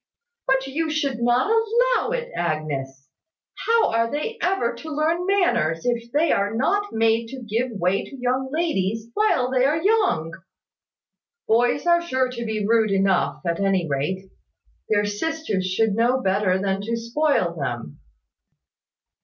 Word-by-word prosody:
"But 265 Hz, 0 st, +2 dB
you 310 Hz, +4 st, -2 dB
should 280 Hz, -5 st, -1 dB
not 245 Hz, -, +2 dB
allow 465 Hz, +2 st, +2 dB
it, -, -, -3 dB
Agnes. 140 Hz, -5 st, -3 dB, 0.6 s
How 460 Hz, 0 st, +3 dB
are 230 Hz, 0 st, +1 dB
they 300 Hz, -, -4 dB
ever 350 Hz, -10 st, +1 dB
to 315 Hz, +7 st, -9 dB
learn 320 Hz, +4 st, 0 dB
manners, 350 Hz, -, +1 dB
if 235 Hz, -1 st, -1 dB
they 300 Hz, +4 st, +2 dB
are 200 Hz, +2 st, 0 dB
not 405 Hz, -, 0 dB
made 225 Hz, +1 st, +1 dB
to 260 Hz, +1 st, -8 dB
give 230 Hz, +3 st, -1 dB
way 195 Hz, -1 st, 0 dB
to 275 Hz, -, -11 dB
young 255 Hz, +1 st, -1 dB
ladies 225 Hz, -, -1 dB
while 260 Hz, -13 st, +1 dB
they 255 Hz, -1 st, +2 dB
are 295 Hz, +4 st, +2 dB
young? 385 Hz, -, +1 dB, 1.2 s
Boys 245 Hz, +6 st, +2 dB
are 345 Hz, 0 st, +4 dB
sure 260 Hz, -6 st, 0 dB
to 235 Hz, -2 st, -5 dB
be 215 Hz, -2 st, -2 dB
rude 225 Hz, -1 st, +3 dB
enough, 195 Hz, -2 st, +1 dB
at 170 Hz, -1 st, -1 dB
any 195 Hz, -3 st, +1 dB
rate. 185 Hz, +7 st, -3 dB, 0.6 s
Their 205 Hz, -1 st, +2 dB
sisters 205 Hz, -, -2 dB
should 210 Hz, +3 st, +1 dB
know 240 Hz, +4 st, +2 dB
better 190 Hz, -4 st, +1 dB
than 195 Hz, 0 st, -1 dB
to 230 Hz, +3 st, -2 dB
spoil 230 Hz, -, 0 dB
them." 120 Hz, -, -5 dB
235 Hz, 150 wpm, -23 LUFS, 195-310 Hz, 1.2 s, are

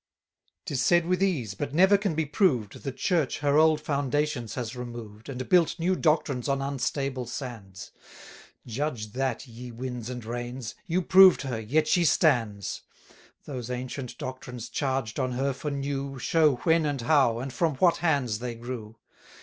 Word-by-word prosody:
'Tis 135 Hz, -3 st, -1 dB
said 175 Hz, +5 st, +4 dB
with 180 Hz, +1 st, 0 dB
ease, 145 Hz, -, 0 dB
but 140 Hz, +7 st, -4 dB
never 190 Hz, +4 st, +6 dB
can 200 Hz, -5 st, 0 dB
be 160 Hz, 0 st, 0 dB
proved, 140 Hz, -, +1 dB
The 135 Hz, -, -3 dB
Church 160 Hz, 0 st, 0 dB
her 145 Hz, +1 st, +3 dB
old 155 Hz, -1 st, +5 dB
foundations 140 Hz, -4 st, -1 dB
has 120 Hz, -1 st, -4 dB
removed, 120 Hz, -2 st, -8 dB
And 130 Hz, -1 st, -5 dB
built 175 Hz, -3 st, +3 dB
new 180 Hz, +2 st, +1 dB
doctrines 150 Hz, -6 st, +1 dB
on 140 Hz, 0 st, +1 dB
unstable 135 Hz, -1 st, -2 dB
sands: 115 Hz, -7 st, -7 dB, 0.7 s
Judge 120 Hz, -3 st, -3 dB
that, 130 Hz, +1 st, -2 dB
ye 125 Hz, 0 st, -10 dB
winds 125 Hz, 0 st, -5 dB
and 125 Hz, -3 st, -6 dB
rains: 120 Hz, +1 st, -5 dB
you 180 Hz, +2 st, 0 dB
proved 185 Hz, -1 st, +7 dB
her, 125 Hz, -4 st, -3 dB
yet 150 Hz, +8 st, +1 dB
she 175 Hz, +1 st, +3 dB
stands. 115 Hz, -, +1 dB, 0.6 s
590 -, -, -11 dB
Those 120 Hz, 0 st, -7 dB
ancient 125 Hz, 0 st, -5 dB
doctrines 125 Hz, -2 st, -7 dB
charged 130 Hz, -6 st, -2 dB
on 130 Hz, -1 st, -1 dB
her 135 Hz, +2 st, 0 dB
for 135 Hz, +3 st, -4 dB
new, 140 Hz, -1 st, -3 dB
Show 155 Hz, +1 st, +3 dB
when 160 Hz, -1 st, +3 dB
and 140 Hz, -3 st, -2 dB
how, 130 Hz, -3 st, +3 dB
and 130 Hz, +2 st, -5 dB
from 160 Hz, -2 st, 0 dB
what 175 Hz, +4 st, +3 dB
hands 140 Hz, -10 st, 0 dB
they 120 Hz, -1 st, -4 dB
grew. 115 Hz, -2 st, -7 dB
135 Hz, 165 wpm, -27 LUFS, 120-155 Hz, 0.7 s, proved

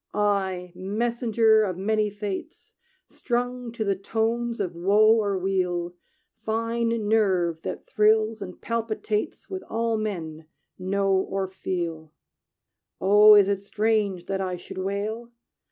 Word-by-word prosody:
"I, 190 Hz, -3 st, 0 dB
messenger 220 Hz, +3 st, +2 dB
of 185 Hz, -4 st, -1 dB
many 215 Hz, +2 st, +1 dB
fates, 205 Hz, -1 st, -7 dB, 0.3 s
Strung 245 Hz, -1 st, -3 dB
to 230 Hz, -, -2 dB
the 200 Hz, -2 st, +1 dB
tones 230 Hz, +4 st, -2 dB
of 185 Hz, -4 st, -2 dB
woe 205 Hz, +6 st, +4 dB
or 200 Hz, -2 st, -1 dB
weal, 180 Hz, -2 st, -1 dB, 0.5 s
Fine 230 Hz, 0 st, -1 dB
nerve 185 Hz, -7 st, +2 dB
that -, -, -6 dB
thrills 215 Hz, +1 st, +2 dB
and 180 Hz, -1 st, -8 dB
palpitates 220 Hz, -2 st, -3 dB
With 380 Hz, -1 st, -5 dB
all 230 Hz, 0 st, 0 dB
men 165 Hz, -7 st, -5 dB, 0.3 s
know 195 Hz, +1 st, 0 dB
or 190 Hz, 0 st, 0 dB
feel, 170 Hz, -4 st, -4 dB, 0.9 s
"Oh, 210 Hz, +2 st, +7 dB
is 200 Hz, -2 st, +6 dB
it 200 Hz, -1 st, 0 dB
strange 205 Hz, -3 st, 0 dB
that 195 Hz, 0 st, -2 dB
I 185 Hz, -1 st, -2 dB
should 180 Hz, +1 st, -9 dB
wail? 210 Hz, +5 st, -3 dB
205 Hz, 125 wpm, -25 LUFS, 190-220 Hz, 0.9 s, Oh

